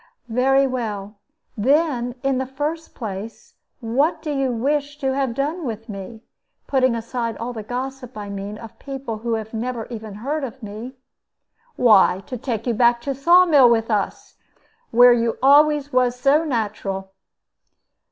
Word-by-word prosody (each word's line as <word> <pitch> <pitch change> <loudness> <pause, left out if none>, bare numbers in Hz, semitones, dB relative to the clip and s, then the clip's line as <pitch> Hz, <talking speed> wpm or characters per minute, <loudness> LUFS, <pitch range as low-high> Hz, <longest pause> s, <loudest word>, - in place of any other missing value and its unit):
"Very 270 +4 +3
well. 215 -5 -4 0.4
Then, 250 0 +1
in 270 -1 +1
the 260 - -2
first 295 +5 -4
place, 215 -1 -7 0.3
what 260 +8 +1
do 305 - -3
you 270 -2 0
wish 285 +4 -1
to 270 -2 -1
have 265 -3 -1
done 305 +6 -2
with 225 -3 -5
me? 210 +3 -8 0.4
Putting 260 -3 +2
aside 230 -1 -3
all 245 +2 -4
the 220 - -6
gossip, 255 +2 -6
I 205 -1 -6
mean, 200 +1 -6
of 225 -1 -12
people 270 -5 -6
who 230 0 -1
have 220 0 -6
never 230 0 -3
even 220 -3 -7
heard 280 +8 -3
of 260 -1 -7
me." 215 +5 -7 0.8
"Why, 195 -5 +5
to 255 - -6
take 230 -2 -4
you 240 - +1
back 235 +1 +3
to 275 +3 -2
Saw 345 +7 +5
mill 285 -8 +6
with 225 -1 +1
us, 205 -2 -2 0.5
where 245 +1 +7
you 230 -1 0
always 290 0 +5
was 250 -1 +2
so 285 +5 +3
natural." 205 -7 -3
245 Hz, 160 wpm, -22 LUFS, 225-275 Hz, 0.8 s, where